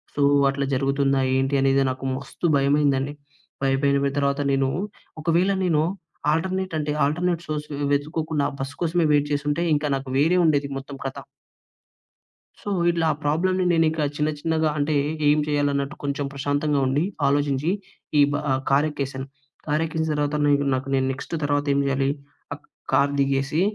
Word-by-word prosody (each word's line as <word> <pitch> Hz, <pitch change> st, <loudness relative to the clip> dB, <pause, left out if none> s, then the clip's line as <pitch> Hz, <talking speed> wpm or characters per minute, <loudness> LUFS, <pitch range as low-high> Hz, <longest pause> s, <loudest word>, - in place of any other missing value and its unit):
So, 145 Hz, -, -1 dB, 0.3 s
అట్లా 140 Hz, 0 st, -1 dB
జరుగుతుందా 135 Hz, +1 st, +1 dB, 0.2 s
ఏంటి, 135 Hz, +1 st, 0 dB
అనేది, 135 Hz, 0 st, +3 dB
నాకు 130 Hz, +1 st, -7 dB
మస్తు 140 Hz, +5 st, -6 dB
భయమైందండి. 140 Hz, 0 st, +2 dB, 0.5 s
పైపైన 140 Hz, +1 st, +2 dB
బెట్ 140 Hz, 0 st, -1 dB
తర్వాత 140 Hz, 0 st, 0 dB
నేను, 135 Hz, -1 st, +2 dB, 0.5 s
ఒకవేళ 170 Hz, +4 st, +2 dB
నేను 160 Hz, -4 st, +2 dB, 0.5 s
ఆల్టర్నేటంటే, 165 Hz, -3 st, -1 dB
ఆల్టర్నేట్ 170 Hz, +3 st, -1 dB
సోర్సు 150 Hz, -1 st, -4 dB, 0.2 s
వెతుక్కోకుండా 150 Hz, 0 st, -1 dB
బస్ 135 Hz, +1 st, -4 dB
కోసమే 170 Hz, 0 st, +1 dB
వెయిట్ 145 Hz, 0 st, +2 dB
జేసుంటే, 145 Hz, +3 st, -1 dB
ఇంకా 150 Hz, 0 st, -1 dB
నాకు 135 Hz, 0 st, -8 dB
వేరే 165 Hz, +6 st, +3 dB
ఉండేది, 145 Hz, -3 st, +2 dB
మొత్తం 135 Hz, 0 st, -8 dB
కథ. 135 Hz, -, -3 dB, 1.4 s
సో, -, -, -6 dB, 0.2 s
ఇట్లా 170 Hz, -1 st, +1 dB
ఆ -, -, -8 dB
ప్రాబ్లమ్‌ని 185 Hz, +5 st, +1 dB
నేనికా 160 Hz, -2 st, +2 dB
చిన్న 150 Hz, +1 st, +1 dB
చిన్నగా 160 Hz, 0 st, +1 dB
అంటే, 145 Hz, +1 st, 0 dB, 0.3 s
ఏం 150 Hz, -, +4 dB
చెయ్యలన్నట్టు 145 Hz, 0 st, 0 dB
కొంచం 140 Hz, 0 st, -2 dB
ప్రశాంతంగా 145 Hz, +1 st, 0 dB
ఉండి, 140 Hz, +4 st, +1 dB, 0.2 s
ఆలోచించి 140 Hz, +1 st, +1 dB, 0.5 s
ఈ -, -, +7 dB
బ -, -, +1 dB, 0.2 s
ఆహ్, 130 Hz, 0 st, +1 dB
కారెక్కేశాను. 140 Hz, -2 st, 0 dB, 0.4 s
కారెక్కేసిన 160 Hz, +1 st, 0 dB
తర్వాత 145 Hz, 0 st, -1 dB
నీకు 145 Hz, -1 st, +3 dB
నాకు 130 Hz, +1 st, -4 dB
నేను 130 Hz, 0 st, +1 dB
నెక్స్ట్ 130 Hz, -, -8 dB
తర్వాత 145 Hz, 0 st, +1 dB
ఏం 140 Hz, -, +2 dB
జెయాలి? 135 Hz, 0 st, +1 dB, 0.4 s
అక్ 145 Hz, -, -12 dB, 0.3 s
కార్ 140 Hz, 0 st, +4 dB
దిగేసి 140 Hz, +4 st, +1 dB
145 Hz, 145 wpm, -24 LUFS, 140-155 Hz, 1.4 s, ఈ